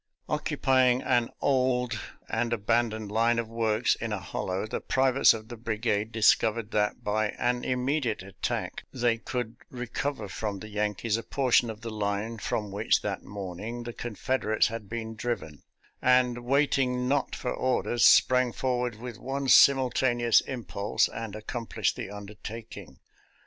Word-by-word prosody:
Occupying 130 -1 +2
an 120 -2 +2
old 125 -3 +1 0.3
and 120 -1 -1
abandoned 110 -1 0
line 115 +2 +2
of 115 -1 -1
works 115 0 +1
in 115 -1 -4
a 105 - -1
hollow, 95 +2 -3
the 110 - -4
privates 130 0 +4
of 110 -1 -4
the 120 - -7
brigade 110 -1 -1
discov 110 0 +4
ered 115 -1 -6
that 105 -1 0
by 110 +1 +1
an 125 0 0
immediate 125 -4 -1
attack 95 0 -4
they 120 -2 +1
could 120 -1 -4
recover 125 -1 -4
from 105 +1 -4
the 110 +3 -9
Yankees 105 +1 -1
a - - -3
portion 125 -3 +2
of 110 0 -7
the 115 -1 -5
line 105 +2 -2
from 105 -1 -2
which, 100 - +1
that - - -3
morning, 100 +4 -6
the 120 0 -6
Confederates 120 0 0
had 110 -3 -7
been 115 0 -4
driven; 95 - -4 0.4
and, 125 -1 +3
waiting 130 -2 +2
not 135 -1 0
for 125 - -3
orders, 125 -2 0
sprang 125 -1 +6
forward 125 -2 -1
with 120 +1 -8
one 135 +2 -3
simultaneous 125 -3 +5
impulse 110 -5 -1
and 115 -3 -6
ac 110 - -9
complished 110 -4 -1
the - - -6
undertaking. 105 - -9
115 Hz, 150 wpm, -28 LUFS, 105-125 Hz, 0.4 s, sprang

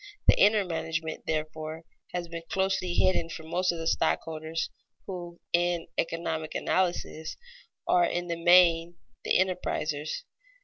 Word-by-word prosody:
The - - +8
inner 210 0 +5
management, 160 -2 -3
therefore, 155 0 -3 0.3
has 175 -1 -3
been 170 0 -6
closely 190 -2 0
hidden 175 -3 +2
from 160 -1 -8
most 180 +1 +2
of 170 - -5
the 165 - -4
stockholders, 160 0 0 0.3
who, 175 -3 -7
in 175 -1 +2
the - - +4
economic 160 -1 -3
analysis, 175 -3 -1 0.5
are 175 -1 +5
in 175 0 -1
the 170 - -1
main 175 -1 +6 0.3
the - - +3
enterprisers. 175 - -1
170 Hz, 135 wpm, -28 LUFS, 160-180 Hz, 0.5 s, The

